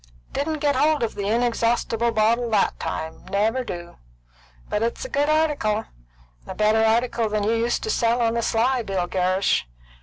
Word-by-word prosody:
"Didn't 305 +1 -2
get 290 -2 +2
hold 300 +1 +2
of 230 - -1
the 200 -1 -4
inexhaustible 235 0 +1
bottle 230 +2 +2
that 210 -3 +1
time; 160 0 -5
never 220 +6 0
do. 175 -6 -8 0.7
But 210 - -1
it's 235 - -2
a - - -6
good 290 -4 +1
article; 290 -9 +1 0.6
a - - -6
better 215 +1 +3
article 230 0 +1
than 210 -1 -1
you 215 +2 +1
used 230 +1 0
to 440 - -1
sell 235 - +1
on 230 -1 +2
the 235 - 0
sly, 245 +3 +1
Bill 195 -5 -2
Gerrish. 185 - +1
230 Hz, 175 wpm, -23 LUFS, 210-245 Hz, 0.7 s, better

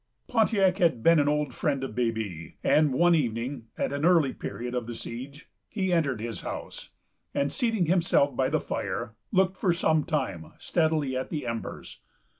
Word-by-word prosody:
Pontiac 200 -5 +2
had 160 -10 +2
been 165 -1 +6
an 145 - +2
old 150 -3 0
friend 140 -1 -1
of 135 - -4
Baby; 110 -8 -3
and 150 -2 +4
one 175 +6 +4
evening, 120 -3 -1
at - - -1
an 140 +1 -2
early 165 -6 +4
period 120 +1 -5
of 125 -2 -2
the 120 - -5
siege, 135 +7 -8 0.2
he 190 -4 -1
entered 140 -9 +1
his 115 0 -5
house, - - -7 0.5
and, 140 0 +1
seating 225 -7 +1
himself 165 -5 +2
by 130 +1 +1
the 155 +2 +1
fire, 120 -4 -4 0.2
looked 190 -1 +2
for 180 - +2
some 160 -2 +2
time 100 - -3
steadily 155 -5 0
at 130 - -3
the 150 -5 -4
embers. 115 -1 -6
145 Hz, 175 wpm, -27 LUFS, 120-170 Hz, 0.5 s, been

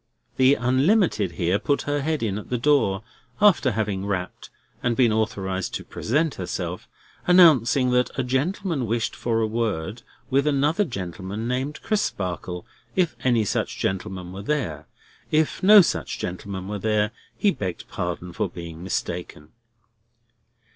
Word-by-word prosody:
The 130 +2 +5
Unlimited 125 - +2
here 90 +3 +1
put 145 - 0
her 145 0 -1
head 155 -2 -1
in 105 -2 -1
at - - -11
the 125 - 0
door—after 130 - +2
having 100 -3 -1
rapped, 95 -3 -4 0.3
and 120 -1 +1
been 120 -3 +4
authorised 100 -4 -1
to - - -4
present 150 +6 0
herself—announcing 125 - +2
that 125 0 +3
a 130 - +1
gentleman 140 - -1
wished 115 +1 -1
for 115 -1 0
a - - +2
word 110 -3 -2 0.3
with 140 +2 +3
another 150 +7 +2
gentleman 95 - -5
named 130 +4 -3
Crisparkle, 90 - -2 0.3
if 175 -9 +1
any 120 -4 +3
such - - -1
gentleman 95 -2 -3
were 95 - -6
there. 100 - -2 0.4
If 155 0 +1
no 205 +2 +9
such - - -1
gentleman 95 +1 -5
were 105 0 -4
there, 105 +1 +1 0.3
he 205 - +3
begged 95 - -5
pardon 90 0 -4
for - - -1
being 85 -2 -8
mistaken. 85 -4 -4
115 Hz, 140 wpm, -24 LUFS, 95-140 Hz, 0.4 s, no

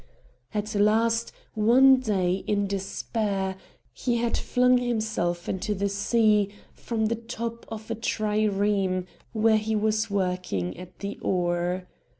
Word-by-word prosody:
At 210 0 -3
last, 225 +3 +2 0.2
one 255 +5 +6
day, 190 -6 0
in 205 -1 +1
despair, 195 0 -2 0.4
he 240 -2 -1
had 235 0 0
flung 250 0 +3
himself 215 -8 -1
into 200 +2 -2
the 200 +1 0
sea 210 0 +2 0.2
from 225 -2 -2
the 230 +2 +1
top 230 0 -6
of 220 0 -7
a - - +2
trireme 205 -4 0 0.3
where 220 0 +4
he 215 +1 -1
was 215 0 +1
working 180 - -1
at 180 0 -11
the 200 0 -5
oar. 180 0 0
210 Hz, 130 wpm, -26 LUFS, 190-225 Hz, 0.4 s, one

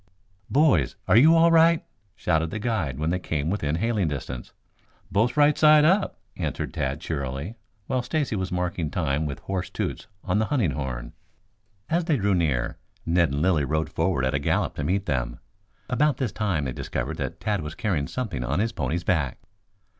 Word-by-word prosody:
"Boys, 130 - +3
are - - +4
you 155 +8 +7
all 165 +1 +5
right?" 165 0 +5 0.3
shouted 80 -2 0
the 110 - -4
guide 100 - -1
when 80 +2 -1
they 90 - 0
came 80 -2 -2
within 75 -7 -1
hailing 105 0 0
distance. 65 -4 -5 0.6
"Both 115 +7 +1
right 145 0 +5
side 150 -1 +6
up," 190 +5 +2 0.2
answered - - -3
Tad 70 +1 -2
cheerily, 70 - -4 0.3
while 130 -1 0
Stacy 145 -2 -1
was 95 -2 -3
marking 90 -2 -1
time 70 +3 -1
with 70 - -6
hoarse 95 -2 -3
toots - - -4 0.2
on 100 +1 +1
the 110 - +2
hunting 115 - +1
horn. 65 -3 -5 0.7
As 170 +1 0
they 160 -5 +2
drew 100 -2 +1
near, 75 -9 0 0.3
Ned 85 0 +3
and 70 +3 -1
Lilly 85 -5 +3
rode 80 +3 -1
forward 65 - 0
at 65 - 0
a 70 - +1
gallop 70 - 0
to 75 - -2
meet 95 +6 0
them. 60 -6 -2 0.5
About 135 +2 +2
this 125 -6 -1
time 95 -9 -1
they 65 - -3
discovered - - -4
that - - -4
Tad 105 -3 -1
was 75 +1 -6
carrying 95 - -1
something 100 - -3
on 70 +6 -1
his 115 +2 +1
pony's 80 +3 -2
back. 80 -8 0
90 Hz, 185 wpm, -25 LUFS, 70-120 Hz, 0.7 s, you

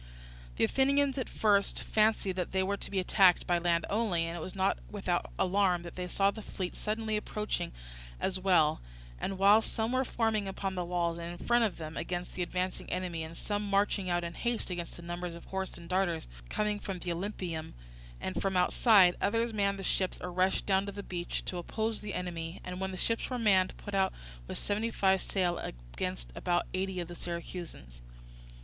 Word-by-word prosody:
The - - +1
Athenians 275 0 +3
at 255 - -3
first 200 -2 +2
fancied 215 -3 +2
that 180 -1 -3
they 190 0 +3
were 200 +2 0
to - - -5
be 200 - -3
attacked 185 -1 +5
by 175 -1 +2
land 170 -1 +2
only, 200 -6 +1
and 165 +1 -4
it - - -4
was 185 - -6
not 190 - +2
without - - -1
alarm 185 -2 +2
that 170 - -8
they 180 0 -3
saw 195 +2 +3
the 220 - -8
fleet 185 -3 -5
suddenly 215 0 -1
approaching 210 0 -2 0.5
as 190 -1 -1
well; 175 - +4 0.4
and 195 - -2
while 200 +3 +7
some 225 +1 -1
were 255 +1 +2
forming 225 -5 0
upon 195 0 -3
the 180 -1 -1
walls 170 -1 0
and 170 +1 -6
in - - -8
front 240 -1 +4
of 210 - -2
them 155 -1 -6
against 175 +1 -3
the 180 - -4
advancing 180 +1 -2
enemy, 180 -2 -2
and 160 +1 -8
some 205 -1 -1
marching 200 -1 +1
out 175 0 +1
in 170 0 -4
haste 235 0 -1
against 175 -1 -4
the 170 - -11
numbers 175 0 -4
of 170 - -11
horse 190 0 -4
and 170 0 -11
darters 175 -3 0 0.2
coming 210 -1 0
from 195 -2 -4
the 175 0 -3
Olympieum 170 -3 -4 0.5
and 185 - -3
from 190 -1 +1
outside, 180 0 +6
others 230 +2 +1
manned 200 -1 +1
the 195 - -6
ships 185 0 +1
or 180 - -5
rushed 185 +2 +1
down 195 0 +2
to - - -3
the 200 0 -6
beach 175 -2 -3
to 180 - -2
oppose 220 +5 -2
the 210 -1 -5
enemy, 170 -1 -4
and 180 0 -5
when 190 0 -1
the 185 - -5
ships 230 +4 0
were 255 - -1
manned 195 -5 +3
put 205 - -8
out 190 -1 +3 0.4
with - - -4
seventy 210 +3 0
five 190 -3 +3
sail 180 -3 0
against - - -5
about 175 - 0
eighty 190 0 -1
of 175 - -3
the 175 - -7
Syracusans. 170 - -7
185 Hz, 205 wpm, -31 LUFS, 175-205 Hz, 0.5 s, while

